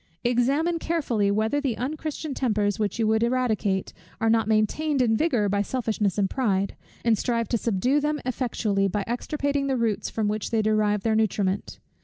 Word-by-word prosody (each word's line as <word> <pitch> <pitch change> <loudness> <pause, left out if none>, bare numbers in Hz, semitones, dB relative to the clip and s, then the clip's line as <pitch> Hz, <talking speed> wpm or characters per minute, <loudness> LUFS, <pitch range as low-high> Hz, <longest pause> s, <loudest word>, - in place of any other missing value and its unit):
Examine 275 +8 +1
carefully, 255 -13 0
whether 220 +8 +1
the 260 -6 -1
unchristian 305 +2 -4
tempers, 210 -6 0
which 210 -1 -1
you 225 - +1
would 220 +1 +2
eradicate, 230 -6 0 0.3
are 225 0 +2
not 225 -2 +2
maintained 245 +8 +1
in 230 -3 +3
vigour 245 -7 +1
by 200 0 +1
selfishness 215 -4 -1
and 200 -2 +2
pride; 200 -5 0 0.3
and 230 -1 +4
strive 230 -2 0
to 235 - +1
subdue 235 +7 +1
them 300 +1 -1
effectually, 225 -6 0
by 200 +1 -1
extirpating 280 +3 -1
the 265 -1 0
roots 225 -3 -1
from 220 -2 -1
which 210 0 -2
they 225 -2 +1
derive 210 -1 +1
their 220 -1 +2
nutriment. 200 -3 0
225 Hz, 175 wpm, -25 LUFS, 210-260 Hz, 0.3 s, and